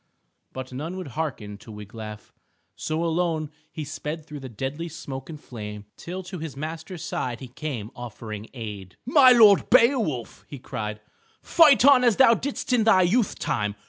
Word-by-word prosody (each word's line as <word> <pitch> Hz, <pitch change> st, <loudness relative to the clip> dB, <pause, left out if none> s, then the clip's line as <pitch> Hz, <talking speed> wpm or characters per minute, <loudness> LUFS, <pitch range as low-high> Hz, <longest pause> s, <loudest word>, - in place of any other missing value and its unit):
But 130 Hz, 0 st, -7 dB
none 160 Hz, +8 st, -5 dB
would 185 Hz, -6 st, -6 dB
hearken 120 Hz, -9 st, -4 dB
to 110 Hz, -, -12 dB
Wiglaf. 105 Hz, +1 st, -9 dB, 0.4 s
So 155 Hz, +2 st, -2 dB
alone 165 Hz, -2 st, 0 dB, 0.2 s
he 155 Hz, -, -5 dB
sped 150 Hz, +2 st, -5 dB
through 150 Hz, -2 st, -8 dB
the 130 Hz, -1 st, -8 dB
deadly 135 Hz, +9 st, -4 dB
smoke 140 Hz, -4 st, -7 dB
and 155 Hz, -2 st, -8 dB
flame, 105 Hz, -5 st, -8 dB
till 185 Hz, +2 st, -7 dB
to 185 Hz, 0 st, -7 dB
his 155 Hz, -3 st, -7 dB
master's 160 Hz, +3 st, -6 dB
side 120 Hz, -2 st, -3 dB
he 130 Hz, -, -9 dB
came 125 Hz, -5 st, -5 dB
offering 110 Hz, -3 st, -8 dB
aid. 105 Hz, -6 st, -7 dB
"My 260 Hz, 0 st, +7 dB
lord 215 Hz, -5 st, +6 dB
Beowulf," 225 Hz, -, +2 dB
he 145 Hz, -, -8 dB
cried, 105 Hz, -3 st, -5 dB, 0.4 s
"fight 300 Hz, -6 st, +6 dB
on 275 Hz, -3 st, +7 dB
as 235 Hz, -4 st, +4 dB
thou 260 Hz, -3 st, +7 dB
didst 260 Hz, +2 st, -3 dB
in 240 Hz, -3 st, +4 dB
thy 195 Hz, -4 st, +5 dB
youth 205 Hz, +4 st, +1 dB
time. 105 Hz, -2 st, -1 dB
150 Hz, 170 wpm, -25 LUFS, 115-185 Hz, 0.4 s, My